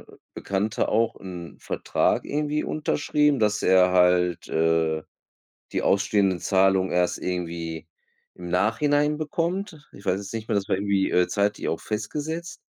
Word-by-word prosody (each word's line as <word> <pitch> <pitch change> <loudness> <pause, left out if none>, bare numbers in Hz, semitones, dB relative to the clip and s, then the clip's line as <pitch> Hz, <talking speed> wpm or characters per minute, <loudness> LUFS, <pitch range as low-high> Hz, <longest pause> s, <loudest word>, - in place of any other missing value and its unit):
a - - -18 0.2
Bekannter 100 +2 -1
auch 115 +1 +1
'n 90 -3 -8
Vertrag - - 0
irgendwie 150 +1 -1
unterschrieben, 150 -1 +1
dass 105 0 +1
er 90 0 +5
halt, 90 -1 +3
äh, 80 -1 +1 0.7
die - - -1
ausstehenden 100 -2 +2
Zahlung 95 0 +2
erst 90 0 +1
irgendwie 85 -3 -4 0.5
im 90 -1 -8
Nachhinein 145 - +2
bekommt. 165 +1 -3
Ich 100 - -14
weiß 90 - +2
jetzt 100 +2 -8
nicht 110 -1 -5
mehr, - - 0
das 100 - -2
war - - +2
irgendwie, 100 0 0
äh, 90 0 +3
zeitlich 100 0 0
auch 80 - -2
festgesetzt 155 +11 -4
100 Hz, 145 wpm, -25 LUFS, 90-145 Hz, 0.7 s, er